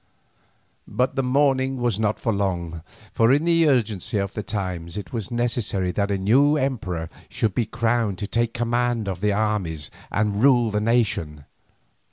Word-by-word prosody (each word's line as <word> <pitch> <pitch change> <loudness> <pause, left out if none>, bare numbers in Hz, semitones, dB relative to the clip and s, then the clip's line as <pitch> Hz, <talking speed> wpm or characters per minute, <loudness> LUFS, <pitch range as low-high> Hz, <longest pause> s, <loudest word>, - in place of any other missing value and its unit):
But 125 +1 0
the 135 - +1
mourning 135 0 +2
was 120 -4 0
not 110 -1 +1
for 115 - 0
long, 85 -5 -2 0.3
for 115 +1 +4
in 145 +4 +3
the 165 -1 +4
urgency 110 -6 0
of 100 -1 -2
the 105 - -3
times 95 -3 -4
it 105 - -7
was 115 -5 -3
necessary 115 -6 -1
that 100 +2 -1
a 100 - 0
new 135 +10 +4
emperor 105 - -2 0.2
should 110 -4 -1
be 115 +1 0
crowned 115 -3 0
to 100 - -4
take 115 +2 0
command 120 -2 0
of 95 -2 -4
the 105 0 +2
armies 100 -8 -1 0.2
and 105 0 0
rule 120 -5 +4
the 105 0 0
nation. 100 - 0
110 Hz, 170 wpm, -23 LUFS, 100-120 Hz, 0.3 s, for